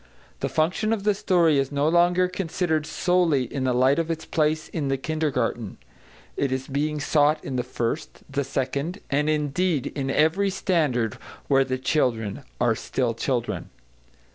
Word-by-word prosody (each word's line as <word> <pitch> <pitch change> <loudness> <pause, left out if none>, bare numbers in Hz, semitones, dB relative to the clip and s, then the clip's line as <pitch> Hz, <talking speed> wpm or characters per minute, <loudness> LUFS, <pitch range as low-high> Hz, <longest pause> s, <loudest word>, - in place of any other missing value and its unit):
The - - -1
function 185 +8 +1
of 210 -3 -2
the 210 0 +3
story 170 -7 +3
is 135 0 -1
no 145 +1 +1
longer 175 +2 +4
considered 165 -4 -1
solely 170 -5 +2
in 130 +2 -3
the 130 - +2
light 130 +4 +3
of 165 0 -1
its 165 -1 -3
place 155 0 0
in 150 -4 -2
the 135 0 +1
kindergarten; 130 -7 -2 0.6
it 140 - 0
is 130 0 -2
being 150 +2 -1
sought 150 +1 +3
in 135 - -4
the 125 - +1
first, 125 +3 -4
the 140 0 -1
second, 140 +7 -2
and 145 +2 +2
indeed 150 0 0
in 135 -2 -3
every 160 +8 +2
standard 155 - 0 0.3
where 135 -1 +4
the 130 -1 -2
children 120 -5 0 0.2
are 120 -1 +3
still 120 +1 -1
children. 120 +1 -2
145 Hz, 165 wpm, -25 LUFS, 130-165 Hz, 0.6 s, longer